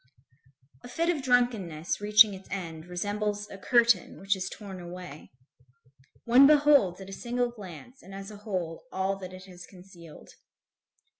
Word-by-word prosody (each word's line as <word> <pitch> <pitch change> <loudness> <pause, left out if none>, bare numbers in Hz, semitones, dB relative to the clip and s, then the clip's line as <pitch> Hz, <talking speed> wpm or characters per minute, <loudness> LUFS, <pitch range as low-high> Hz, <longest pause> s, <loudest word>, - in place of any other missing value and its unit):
A - - -9
fit 335 +7 0
of 290 - -5
drunkenness 220 - 0
reaching 210 0 +6
its 190 0 -11
end 165 -4 -6
resembles 205 +3 -3
a 195 - -8
curtain 235 -2 +2
which 195 +1 0
is 190 0 -4
torn 195 -3 -9
away. 175 -3 -10 1.0
One 255 +4 +7
beholds, 285 -11 +4
at 190 - -10
a - - -8
single 245 +2 -2
glance 210 - -12
and 195 - -14
as 195 +1 -8
a 210 - -10
whole, 185 -4 -5
all 190 +1 -1
that 185 -2 -9
it 185 0 -11
has 180 -2 -12
concealed. 180 -4 -15
195 Hz, 155 wpm, -28 LUFS, 180-235 Hz, 1.0 s, One